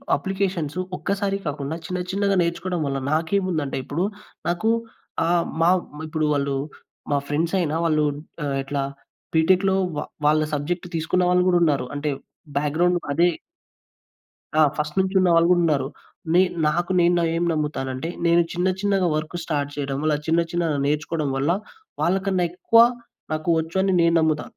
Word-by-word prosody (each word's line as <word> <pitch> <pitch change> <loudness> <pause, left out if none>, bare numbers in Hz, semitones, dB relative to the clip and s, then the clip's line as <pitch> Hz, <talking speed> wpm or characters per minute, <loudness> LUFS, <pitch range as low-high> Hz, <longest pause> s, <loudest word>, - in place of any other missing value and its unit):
Applications 185 -2 -2 0.2
ఒక్కసారి 195 0 -1
కాకుండా 145 +1 -3
చిన్న 180 +2 -3
చిన్నగా 200 0 +1
నేర్చుకోవడం 170 0 -1
వల్ల 135 -1 -1
నాకేముందంటే 160 -2 0
ఇప్పుడు 165 +7 -2 0.4
నాకు 175 +6 +1 0.6
ఆహ్, 170 0 +2 0.2
మా 165 - +5 0.4
ఇప్పుడు 155 0 -1
వాళ్ళు 140 -1 0 0.6
మా 145 - +3
ఫ్రెండ్స్ 160 +5 -1
అయిన 155 -3 0
వాళ్ళు 155 -2 +2 0.4
ఆహ్, 140 -1 -1
ఇట్లా 140 0 -2 0.5
బీటెక్‌లో 185 +4 +3 0.2
వ - - 0 0.3
వాళ్ళ 155 +1 +4
సబ్జెక్ట్ 170 +5 -2
తీసుకున్న 165 +3 +1
వాళ్ళు 180 0 +4
గూడా 175 -1 +4
ఉన్నారు. 145 -5 +2
అంటే 150 +1 -2 0.5
బ్యాక్‌ 145 +1 -1
గ్రౌండ్ 175 +1 +3 0.2
అదే. 170 +4 +4 1.3
ఆ! - - +7 0.2
ఫస్ట్ 150 +3 -3
నుంచి 190 +1 -2
ఉన్నవాళ్ళు 170 -2 +4
గూడా 175 - +4
ఉన్నారు. 145 -5 +1 0.5
నే 180 - +6 0.3
నాకు 175 +4 0
నేను 175 0 +3
ఏం 170 - 0
నమ్ముతానంటే 150 -1 -2 0.2
నేను 170 0 +5
చిన్న 180 +2 0
చిన్నగా 195 -3 +2
వర్క్ 155 +2 -3
స్టార్ట్ 145 -3 -2
చేయడం 140 -2 -3
వల్ల 155 -1 +2
చిన్న 165 +1 +3
చిన్నగా 170 -4 0
నేర్చుకోవడం 150 0 -1
వల్ల 140 +3 0 0.5
వాళ్ళకన్నా 190 0 +1
ఎక్కువ 230 +5 +3 0.5
నాకు 155 +2 -2
వచ్చు 160 +3 -5
అని 190 -1 +2
నేను 170 0 +3
నమ్ముతా. 155 -2 0
165 Hz, 150 wpm, -23 LUFS, 150-180 Hz, 1.3 s, ఆ